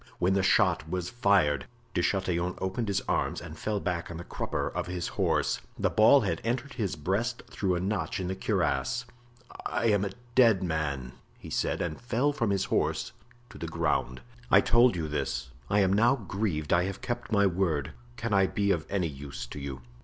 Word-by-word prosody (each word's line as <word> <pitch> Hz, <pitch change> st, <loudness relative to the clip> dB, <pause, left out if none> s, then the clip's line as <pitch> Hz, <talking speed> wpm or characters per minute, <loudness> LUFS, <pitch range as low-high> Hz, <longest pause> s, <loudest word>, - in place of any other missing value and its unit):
when 90 Hz, +2 st, +2 dB
the 100 Hz, -, +3 dB
shot 80 Hz, -4 st, +3 dB
was 90 Hz, 0 st, -3 dB
fired. 100 Hz, -, +2 dB, 0.3 s
De -, -, +1 dB
Chatillon 90 Hz, -2 st, 0 dB
opened 95 Hz, +5 st, -2 dB
his 100 Hz, 0 st, 0 dB
arms -, -, -1 dB
and -, -, -9 dB
fell 105 Hz, -1 st, -1 dB
back 90 Hz, -3 st, -2 dB
on 85 Hz, -, -6 dB
the 85 Hz, -, -6 dB
crupper -, -, -3 dB
of -, -, -3 dB
his 90 Hz, -1 st, -3 dB
horse. -, -, 0 dB, 0.2 s
The -, -, +1 dB
ball 110 Hz, +6 st, +6 dB
had 100 Hz, -4 st, -1 dB
entered 125 Hz, +4 st, -2 dB
his 100 Hz, -7 st, -2 dB
breast 100 Hz, +10 st, -1 dB
through 95 Hz, -3 st, 0 dB
a -, -, -1 dB
notch 95 Hz, -2 st, -2 dB
in 90 Hz, -, -2 dB
the 95 Hz, -, -2 dB
cuirass. 125 Hz, +5 st, 0 dB, 0.6 s
"I 115 Hz, -, +1 dB
am 100 Hz, -1 st, +2 dB
a 100 Hz, -, -1 dB, 0.2 s
dead 115 Hz, -7 st, +5 dB
man," 75 Hz, -7 st, -2 dB, 0.3 s
he -, -, -11 dB
said, -, -, 0 dB
and 85 Hz, +4 st, -4 dB
fell 125 Hz, +5 st, +1 dB
from 115 Hz, -6 st, 0 dB
his 95 Hz, -1 st, +1 dB
horse -, -, 0 dB, 0.4 s
to -, -, -11 dB
the 85 Hz, -, -4 dB
ground. 80 Hz, -6 st, -1 dB, 0.3 s
"I -, -, +7 dB
told 120 Hz, -1 st, +4 dB
you 80 Hz, -3 st, -2 dB
this, 75 Hz, -3 st, -3 dB, 0.2 s
I 100 Hz, 0 st, +4 dB
am 95 Hz, -1 st, +3 dB
now 115 Hz, +6 st, +4 dB
grieved 95 Hz, -, -2 dB
I 85 Hz, +1 st, +4 dB
have 95 Hz, +3 st, -5 dB
kept 120 Hz, -1 st, -4 dB
my 100 Hz, -2 st, +4 dB
word. 85 Hz, -7 st, 0 dB, 0.3 s
Can 115 Hz, -2 st, -2 dB
I 95 Hz, -1 st, +5 dB
be 100 Hz, 0 st, +1 dB
of 80 Hz, -5 st, -1 dB
any 95 Hz, -3 st, 0 dB
use 70 Hz, -4 st, -7 dB
to 60 Hz, -, -8 dB
you?" 70 Hz, -2 st, -6 dB
95 Hz, 200 wpm, -29 LUFS, 85-110 Hz, 0.6 s, I